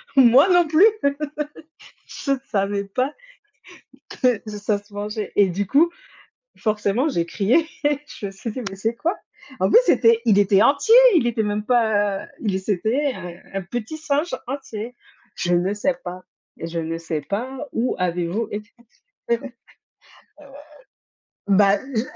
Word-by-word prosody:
Moi 265 Hz, +6 st, +6 dB
non 350 Hz, -2 st, +4 dB
plus. 320 Hz, +7 st, +5 dB, 1.2 s
Je 275 Hz, -, -4 dB, 0.2 s
savais 200 Hz, -1 st, 0 dB
pas 255 Hz, +8 st, -2 dB, 1.1 s
que 250 Hz, -4 st, +3 dB
ça 210 Hz, 0 st, -2 dB
se 205 Hz, 0 st, -26 dB
mangeait. 210 Hz, +1 st, -4 dB
Et 200 Hz, -2 st, +5 dB
du 195 Hz, +3 st, -2 dB
coup, 300 Hz, -, +4 dB, 0.7 s
forcément, 215 Hz, +5 st, 0 dB
j'ai 170 Hz, -, -1 dB
crié. 235 Hz, -, +1 dB, 0.4 s
Je 205 Hz, -, -7 dB
me -, -, -8 dB
suis 195 Hz, +4 st, -6 dB
dit: 255 Hz, -, -5 dB
«Mais 195 Hz, -, -8 dB
c'est 220 Hz, +4 st, -2 dB
quoi?» 335 Hz, +9 st, -1 dB, 0.4 s
En -, -, +2 dB
plus, 465 Hz, -, +8 dB
c'était, 230 Hz, 0 st, +4 dB
il 210 Hz, -3 st, +4 dB
était 200 Hz, 0 st, +4 dB
entier, 285 Hz, -, +4 dB, 0.2 s
il 250 Hz, -8 st, +3 dB
était 225 Hz, -2 st, 0 dB
même 210 Hz, 0 st, -2 dB
pas, 205 Hz, -5 st, +1 dB
heu, -, -, -12 dB
il 195 Hz, -4 st, -1 dB
c'était, 225 Hz, +9 st, 0 dB
heu, 175 Hz, -1 st, -8 dB, 0.2 s
un 195 Hz, -, -2 dB
petit 240 Hz, -, -5 dB
singe 310 Hz, +2 st, -1 dB
entier. 245 Hz, -3 st, -6 dB, 0.4 s
Je 175 Hz, -, -1 dB
ne 180 Hz, +3 st, +1 dB
sais 260 Hz, +6 st, 0 dB
pas 180 Hz, +1 st, -7 dB, 0.4 s
je 165 Hz, +1 st, -5 dB
ne 165 Hz, 0 st, -3 dB
sais 165 Hz, -2 st, -4 dB
pas 260 Hz, -, -5 dB
où 240 Hz, +3 st, 0 dB
avez-vous 180 Hz, +4 st, -1 dB
été 210 Hz, +1 st, -6 dB, 0.6 s
heu 235 Hz, -, +3 dB, 2.1 s
Bah, 200 Hz, 0 st, +5 dB, 0.2 s
je 220 Hz, -, +1 dB
215 Hz, 150 wpm, -22 LUFS, 195-255 Hz, 2.1 s, plus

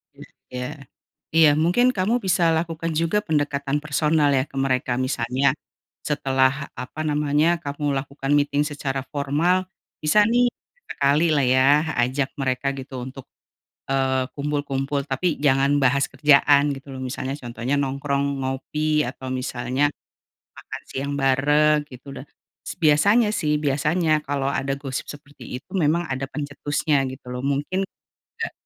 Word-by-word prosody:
Iya -, -, -12 dB, 0.3 s
iya. 125 Hz, 0 st, -3 dB, 0.7 s
Iya 160 Hz, -2 st, +7 dB
mungkin 210 Hz, +11 st, +3 dB
kamu 225 Hz, +3 st, 0 dB
bisa 190 Hz, -2 st, +2 dB
lakukan 165 Hz, 0 st, -2 dB
juga 165 Hz, +6 st, +1 dB
pendekatan 145 Hz, -5 st, -1 dB
personal 150 Hz, 0 st, +2 dB
ya 130 Hz, -1 st, +2 dB
ke -, -, -18 dB
mereka, 130 Hz, -2 st, 0 dB
misalnya 130 Hz, +1 st, +1 dB, 0.6 s
setelah 135 Hz, -1 st, +1 dB
apa 130 Hz, +5 st, -7 dB
namanya, 150 Hz, +2 st, +2 dB
kamu 145 Hz, 0 st, -2 dB
lakukan 135 Hz, 0 st, -3 dB
meeting 145 Hz, 0 st, +2 dB
secara 140 Hz, -3 st, -3 dB
formal, 160 Hz, +6 st, +1 dB, 0.3 s
bisa 155 Hz, +8 st, +4 dB
nih, 240 Hz, +3 st, +3 dB, 0.3 s
sesekali 150 Hz, -, +1 dB
lah 140 Hz, -, +2 dB
ya 130 Hz, +1 st, +4 dB, 0.3 s
ajak 130 Hz, +3 st, 0 dB
mereka 135 Hz, +1 st, 0 dB
gitu 130 Hz, -1 st, -7 dB
untuk, 130 Hz, +1 st, -9 dB, 0.6 s
eee, 130 Hz, -1 st, +1 dB
kumpul-kumpul 140 Hz, -1 st, -2 dB
tapi 145 Hz, +4 st, -1 dB
jangan 140 Hz, 0 st, +3 dB
bahas 135 Hz, +1 st, +3 dB
kerjaan 145 Hz, +1 st, +4 dB
gitu 135 Hz, 0 st, -8 dB
loh, 130 Hz, -, -6 dB
misalnya 130 Hz, +1 st, -4 dB
contohnya 120 Hz, 0 st, -3 dB
nongkrong, 140 Hz, 0 st, -1 dB
ngopi, 150 Hz, +3 st, 0 dB
atau 130 Hz, +1 st, -6 dB
misalnya, 130 Hz, +2 st, -1 dB, 0.7 s
makan -, -, -8 dB
siang 140 Hz, +2 st, -3 dB
bareng 145 Hz, +2 st, +3 dB
gitu 130 Hz, 0 st, -12 dB
dah. 135 Hz, -, -10 dB, 0.6 s
Biasanya 200 Hz, +9 st, +4 dB
sih, 155 Hz, -8 st, 0 dB
biasanya 155 Hz, +3 st, +1 dB
kalo 140 Hz, -1 st, -1 dB
ada 135 Hz, -1 st, -1 dB
gosip 135 Hz, -1 st, -5 dB
seperti 145 Hz, -3 st, -9 dB
itu -, -, -65 dB
memang 165 Hz, +1 st, +2 dB
ada 130 Hz, +1 st, -2 dB
pencetusnya 145 Hz, 0 st, -1 dB
gitu 130 Hz, -1 st, -10 dB
loh. 125 Hz, 0 st, -4 dB
Mungkin, 145 Hz, +8 st, -1 dB, 0.3 s
nggak -, -, -7 dB
140 Hz, 135 wpm, -23 LUFS, 135-150 Hz, 0.7 s, Iya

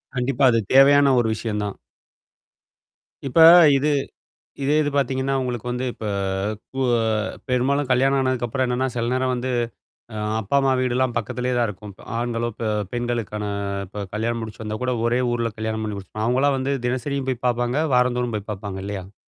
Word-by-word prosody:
கண்டிப்பா. 125 Hz, +1 st, 0 dB
அது 115 Hz, -, +2 dB
தேவையான 140 Hz, 0 st, +6 dB
ஒரு 120 Hz, -, +1 dB
விஷயம் 105 Hz, -1 st, -3 dB
தான். 100 Hz, -1 st, -4 dB, 1.5 s
இப்ப 135 Hz, +5 st, +1 dB, 0.4 s
இது 145 Hz, +3 st, +1 dB, 0.7 s
இதே 140 Hz, +2 st, +2 dB
இது 145 Hz, -, -1 dB
பார்த்தீங்கன்னா, 135 Hz, -1 st, 0 dB
உங்களுக்கு 125 Hz, -2 st, -4 dB
வந்து 125 Hz, +1 st, -2 dB
இப்ப -, -, -10 dB, 0.7 s
கு 135 Hz, -, -4 dB, 0.2 s
அ -, -, 0 dB, 0.4 s
பெரும்பாலும் 135 Hz, +2 st, +1 dB
கல்யாணம் 135 Hz, +2 st, +3 dB
ஆனதுக்கப்புறம் 130 Hz, 0 st, 0 dB
என்னன்னா, 125 Hz, +1 st, 0 dB
சில 120 Hz, 0 st, -1 dB
நேரம் 130 Hz, 0 st, 0 dB
வந்து 125 Hz, +1 st, -3 dB, 0.6 s
அ -, -, -5 dB, 0.2 s
அப்பா, 110 Hz, +7 st, -1 dB
அம்மா 135 Hz, -1 st, +2 dB
வீடுலாம் 125 Hz, -1 st, 0 dB
பக்கத்திலேயே 125 Hz, +3 st, -2 dB
தான் 120 Hz, -, +2 dB
இருக்கும். 105 Hz, 0 st, -9 dB, 0.2 s
ஆண்களோ, 120 Hz, 0 st, -1 dB
அ -, -, -42 dB
பெ 115 Hz, -, -2 dB, 0.3 s
பெண்களுக்கான 120 Hz, -3 st, -3 dB, 0.4 s
இப்ப 100 Hz, +2 st, -6 dB
கல்யாணம் 115 Hz, +2 st, -1 dB
முடிச்சு 110 Hz, 0 st, -8 dB
வந்தா 110 Hz, 0 st, -4 dB
கூட 125 Hz, 0 st, 0 dB
ஒரே 120 Hz, +2 st, +1 dB
ஊர்ல 120 Hz, -1 st, -1 dB
கல்யாண 110 Hz, 0 st, -2 dB
பண்ணி 105 Hz, -1 st, -4 dB
முடிச்சி 100 Hz, +2 st, -9 dB
அவங்களாம் 135 Hz, +3 st, +2 dB
வந்து 135 Hz, +2 st, -1 dB
தினசரியும் 135 Hz, +2 st, -2 dB
போய் 125 Hz, -1 st, -5 dB
பார்ப்பாங்க. 120 Hz, +2 st, 0 dB, 0.2 s
வாரந்தோறும் 125 Hz, -2 st, +1 dB
போய் 105 Hz, 0 st, -7 dB
பார்ப்பாங்க 100 Hz, -1 st, -6 dB
இல்லையா? 100 Hz, -1 st, -6 dB
125 Hz, 165 wpm, -22 LUFS, 110-130 Hz, 1.5 s, தேவையான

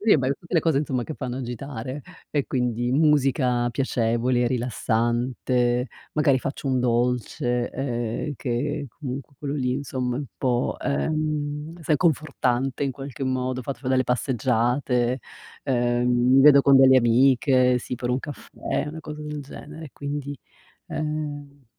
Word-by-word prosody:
Sì, 210 Hz, -4 st, +5 dB
beh, 130 Hz, +1 st, +1 dB
tutte 170 Hz, +1 st, -8 dB
le 165 Hz, -, +5 dB
cose 160 Hz, -4 st, +2 dB
insomma 130 Hz, -5 st, -1 dB
che 155 Hz, -, -6 dB
fanno 125 Hz, -2 st, -4 dB
agitare, 130 Hz, +2 st, -5 dB, 0.3 s
e 145 Hz, -2 st, 0 dB
quindi 120 Hz, -1 st, -1 dB
musica 135 Hz, -5 st, +3 dB
piacevole, 120 Hz, -1 st, +1 dB
rilassante, 120 Hz, +1 st, 0 dB, 0.3 s
magari 145 Hz, -3 st, +3 dB
faccio 135 Hz, +2 st, -5 dB
un 130 Hz, -1 st, +2 dB
dolce, 120 Hz, 0 st, 0 dB
ehm, 120 Hz, +1 st, -3 dB
che 140 Hz, +5 st, -2 dB
comunque 140 Hz, +1 st, -7 dB
quello 145 Hz, 0 st, -3 dB
lì 125 Hz, -3 st, 0 dB
insomma 130 Hz, -2 st, -2 dB
è -, -, -2 dB
un -, -, -4 dB
po', 125 Hz, -1 st, 0 dB
ehm, 150 Hz, +2 st, -2 dB
sai 150 Hz, 0 st, +2 dB
confortante 135 Hz, -5 st, 0 dB
in 135 Hz, -, -1 dB
qualche 135 Hz, 0 st, -6 dB
modo, 130 Hz, 0 st, -1 dB
ho -, -, -8 dB
fatto 135 Hz, 0 st, -5 dB
fa 130 Hz, -, -4 dB
delle 130 Hz, -1 st, +3 dB
passeggiate, 125 Hz, 0 st, +1 dB, 0.5 s
ehm, 120 Hz, -1 st, +1 dB
mi 125 Hz, +2 st, +4 dB
vedo 140 Hz, -1 st, +8 dB
con 140 Hz, -1 st, +6 dB
delle 130 Hz, 0 st, +7 dB
amiche, 125 Hz, +1 st, +4 dB
sì, 125 Hz, -, -5 dB
per 125 Hz, 0 st, -3 dB
un 125 Hz, -, +1 dB
caffè, 145 Hz, 0 st, -4 dB
una 160 Hz, +2 st, -7 dB
cosa 150 Hz, -1 st, -7 dB
del 150 Hz, -1 st, -5 dB
genere, 150 Hz, +2 st, -10 dB
quindi, 145 Hz, -1 st, -5 dB, 0.5 s
ehm 145 Hz, -2 st, -5 dB
130 Hz, 150 wpm, -24 LUFS, 125-145 Hz, 0.5 s, vedo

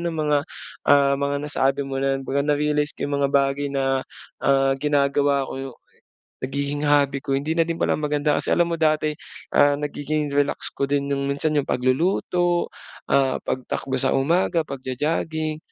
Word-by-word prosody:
ng 170 Hz, -1 st, -2 dB
mga, 150 Hz, -2 st, +2 dB, 0.5 s
ah, 140 Hz, -1 st, +5 dB
mga 140 Hz, 0 st, 0 dB
nasabi 140 Hz, -1 st, +1 dB
mo 135 Hz, 0 st, -4 dB
na 135 Hz, 0 st, +1 dB
kumbaga, 135 Hz, +1 st, -1 dB
na-realize 150 Hz, 0 st, +1 dB
ko -, -, -3 dB
'yong 145 Hz, -, -2 dB
mga -, -, +3 dB
bagay 140 Hz, 0 st, +2 dB
na, 135 Hz, -1 st, 0 dB, 0.4 s
ah, 135 Hz, 0 st, +3 dB
ginagawa 140 Hz, 0 st, +2 dB
ko -, -, -6 dB
yong 135 Hz, -2 st, -7 dB, 0.6 s
nagiging 140 Hz, +2 st, -3 dB
hobby 140 Hz, -1 st, +3 dB
ko, 135 Hz, 0 st, -1 dB
hindi 145 Hz, +3 st, -1 dB
na 165 Hz, 0 st, +1 dB
din 165 Hz, -, -1 dB
pala -, -, 0 dB
maganda. 150 Hz, 0 st, +1 dB
Kasi -, -, -5 dB
alam 175 Hz, -, +3 dB
mo 170 Hz, -, 0 dB
kasi 160 Hz, -, +2 dB
dati, 155 Hz, 0 st, +1 dB, 0.5 s
ah, 145 Hz, 0 st, +5 dB
nagiging 150 Hz, +1 st, -2 dB
relax 145 Hz, 0 st, 0 dB
ko 140 Hz, -, -1 dB
din 140 Hz, 0 st, 0 dB
'yong 140 Hz, 0 st, -1 dB
minsan 145 Hz, +3 st, 0 dB
'yong 140 Hz, -, -1 dB
pagluluto, 175 Hz, +6 st, +1 dB, 0.4 s
ah, 135 Hz, -1 st, +3 dB
pagtakbo 130 Hz, +1 st, -3 dB
sa -, -, +1 dB
umaga, 165 Hz, +4 st, +2 dB
pagjo-jogging. 155 Hz, +4 st, -2 dB
145 Hz, 170 wpm, -23 LUFS, 135-150 Hz, 0.6 s, ah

